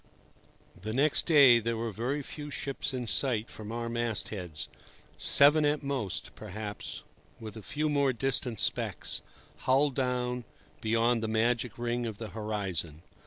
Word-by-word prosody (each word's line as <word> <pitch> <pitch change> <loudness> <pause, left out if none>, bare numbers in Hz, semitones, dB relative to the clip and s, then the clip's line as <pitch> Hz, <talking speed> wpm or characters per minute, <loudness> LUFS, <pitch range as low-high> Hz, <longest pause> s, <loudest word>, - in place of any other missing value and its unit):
The 110 +3 -4
next 145 +4 +2
day 140 -7 +7
there 115 0 -2
were 115 0 -3
very 125 +8 -3
few 150 +2 -8
ships 140 0 -3
in 125 -2 -4
sight 115 -1 0
from 110 0 -8
our 115 0 -3
mast 115 -2 -2
heads—seven 105 - +3
at 150 0 +1
most, 135 -9 -4
perhaps, 105 +2 -6 0.4
with 110 -2 -8
a 110 - -8
few 150 +9 -2
more 140 -2 +2
distant 125 -2 -2
specks, - - 0 0.4
hull 140 +3 +2
down, 125 -2 -2 0.4
beyond 115 +1 +2
the 110 - -2
magic 115 +1 0
ring 120 0 -2
of 110 -3 -6
the 110 -1 -7
horizon. 100 -7 -4
120 Hz, 145 wpm, -29 LUFS, 110-135 Hz, 0.4 s, day